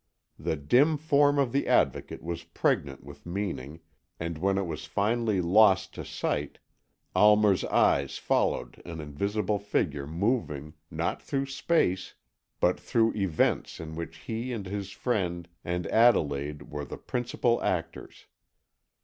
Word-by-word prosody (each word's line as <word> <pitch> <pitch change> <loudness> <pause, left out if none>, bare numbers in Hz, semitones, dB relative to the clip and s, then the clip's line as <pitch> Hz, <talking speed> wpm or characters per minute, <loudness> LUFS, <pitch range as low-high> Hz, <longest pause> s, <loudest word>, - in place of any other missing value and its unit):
The 80 - -1
dim 125 - +3
form 145 -1 +3
of 135 -4 +2
the 140 - 0
Advocate - - +1
was 85 0 -4
pregnant 70 -4 -1
with 70 0 -12
meaning, 85 -5 -4 0.4
and 85 0 -3
when 95 +2 +1
it 100 - 0
was 80 -3 -5
finally 110 -1 +1
lost 95 +1 +4
to - - -6
sight, 75 -1 -3 0.6
Almer's 105 -2 +5
eyes 70 -1 +2
followed - - 0
an 85 -2 -7
invisible 100 +8 -1
figure 75 -8 -1
moving, 80 - -1 0.2
not - - -2
through 135 -1 -2
space, 135 - 0 0.4
but 90 - +2
through 115 -3 +2
events 95 -7 0
in 80 -1 -7
which 85 0 -6
he 115 +9 -4
and 110 -5 -4
his 100 +1 -4
friend 90 -7 -2 0.2
and 90 0 -2
Adelaide 75 -11 +2
were 75 0 -4
the - - -7
principal 120 -1 -1
actors. - - -3
95 Hz, 135 wpm, -28 LUFS, 80-115 Hz, 0.6 s, Almer's